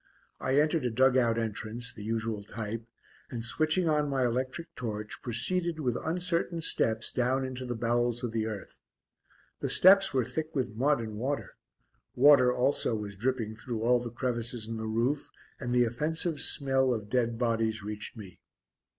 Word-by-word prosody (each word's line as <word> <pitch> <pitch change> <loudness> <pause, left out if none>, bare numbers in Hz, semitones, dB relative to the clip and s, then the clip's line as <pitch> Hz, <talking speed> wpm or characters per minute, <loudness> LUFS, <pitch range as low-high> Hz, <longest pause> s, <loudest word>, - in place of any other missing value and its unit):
I 130 +2 +2
entered 155 0 +2
a - - +2
dug 130 +3 +3
out 120 -3 +3
entrance, 115 +2 -3
the 105 - -10
usual 110 -1 -2
type, 110 +2 -6 0.4
and 115 -2 -5
switching 155 +7 +1
on 150 -2 +2
my 135 -2 +1
electric 130 +7 -3
torch, 105 -3 -5
proceeded 165 +8 -1
with 125 -5 0
uncertain 170 0 0
steps 110 -7 +1
down 130 +2 0
into 130 -1 -6
the 120 - -3
bowels 120 +1 0
of 120 - -2
the 110 -1 -1
earth. 105 -3 -7 0.8
The - - -2
steps 195 +1 +6
were 130 -3 +1
thick 160 +4 -4
with 130 -6 -1
mud 135 +4 +2
and 110 -2 -6
water; 140 +4 -3 0.6
water 130 -2 +6
also 125 -2 +1
was 105 -2 -5
dripping 115 0 -1
through 115 -1 -5
all 125 +1 +4
the 120 0 -5
crevices 120 -1 -2
in 115 0 -4
the 110 0 -4
roof, 120 +6 0 0.3
and 120 -3 -4
the 125 0 +4
offensive 150 +6 0
smell 135 -3 +3
of 105 -2 -6
dead 120 0 0
bodies 115 -2 0
reached 105 +1 -6
me. 95 -4 -11
120 Hz, 170 wpm, -29 LUFS, 115-140 Hz, 0.8 s, steps